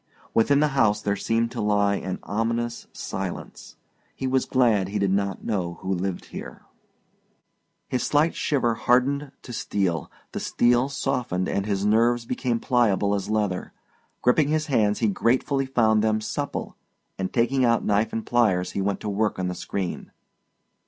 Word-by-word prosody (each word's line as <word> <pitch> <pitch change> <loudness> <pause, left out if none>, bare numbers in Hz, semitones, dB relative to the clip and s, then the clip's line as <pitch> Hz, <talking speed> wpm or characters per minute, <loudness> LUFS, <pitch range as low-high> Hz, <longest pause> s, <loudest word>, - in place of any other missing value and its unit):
Within 140 +6 +4
the 150 - +3
house 110 -7 +2
there 100 -1 -1
seemed 115 +3 0
to - - -4
lie 105 -1 +2
an 95 -2 -3
ominous 115 +3 -2
silence. 95 -2 -6 0.4
He 135 - -4
was 130 0 +1
glad 115 -7 +2
he 105 +2 -3
did 100 -2 +1
not 100 0 -1
know 90 -6 -2
who 95 - -1
lived 95 0 -3
here. - - -8 1.2
His 125 - -1
slight 150 +3 +2
shiver 125 -6 +1
hardened 135 +5 +1
to 120 - -8
steel; 95 -6 -1 0.2
the - - -4
steel 120 +2 +2
softened 125 -10 -1
and 100 +1 -1
his 100 -1 0
nerves 115 +3 +3
became 120 -1 -1
pliable 105 -6 +2
as 100 -1 -2
leather; 105 -4 -1 0.5
gripping 140 +4 +4
his 155 +1 0
hands 110 -8 +1
he 115 - +3
gratefully 130 +6 +1
found 110 -5 +3
them 110 -1 +2
supple, 140 +6 -4 0.4
and 95 -1 -2
taking 130 +3 +2
out 115 -1 +2
knife 105 +2 +2
and 115 - -3
pliers 105 -7 +2
he 100 - -2
went 100 0 -1
to - - -5
work 105 +1 0
on 90 -1 -1
the - - -2
screen. 95 0 -4
110 Hz, 165 wpm, -25 LUFS, 100-125 Hz, 1.2 s, Within